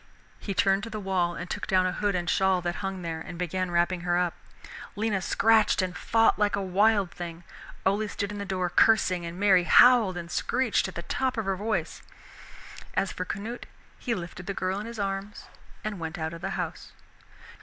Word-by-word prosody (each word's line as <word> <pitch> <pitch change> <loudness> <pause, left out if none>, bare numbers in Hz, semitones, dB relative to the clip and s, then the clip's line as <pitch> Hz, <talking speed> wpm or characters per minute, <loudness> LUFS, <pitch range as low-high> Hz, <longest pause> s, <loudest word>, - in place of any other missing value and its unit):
He 195 - -4
turned 195 +1 +3
to 230 - -6
the 215 -1 -5
wall 185 -3 0
and 175 - -6
took - - -4
down 185 -1 +3
a 185 - +1
hood 205 +1 -1
and 175 -1 -2
shawl 190 +2 +3
that 175 0 -2
hung 195 -2 -4
there, 165 -1 -4
and 175 +1 -8
began 180 +1 -2
wrapping 175 +1 +1
her 175 0 +1
up. 180 -1 +1 0.6
Lena 205 -2 0
scratched 220 +3 +3
and 185 -2 -1
fought 225 +4 +2
like 205 -1 +2
a 200 - -2
wild 200 0 +2
thing. 170 -1 -7 0.4
Ole 205 +3 +2
stood 200 0 -4
in 205 - -6
the - - -3
door, 185 -2 -1
cursing, 185 -3 +3
and 170 +2 -7
Mary 190 -3 +4
howled 225 -1 +6
and 170 0 -7
screeched 250 -5 +1
at 190 - -9
the 170 - -5
top 260 +6 -1
of 225 - -1
her 195 0 0
voice. 215 +3 -2 0.9
As 195 - +1
for 180 - -4
Canute, 220 +6 -6 0.3
he 240 -3 -1
lifted 180 0 -7
the 200 - -3
girl 185 +1 -1
in 210 - -6
his 235 0 -8
arms 195 0 -4 0.4
and 215 -3 -4
went 165 +2 -5
out 160 0 -3
of 165 - -9
the 195 - -3
house. 175 -3 -5
190 Hz, 210 wpm, -27 LUFS, 175-205 Hz, 0.9 s, howled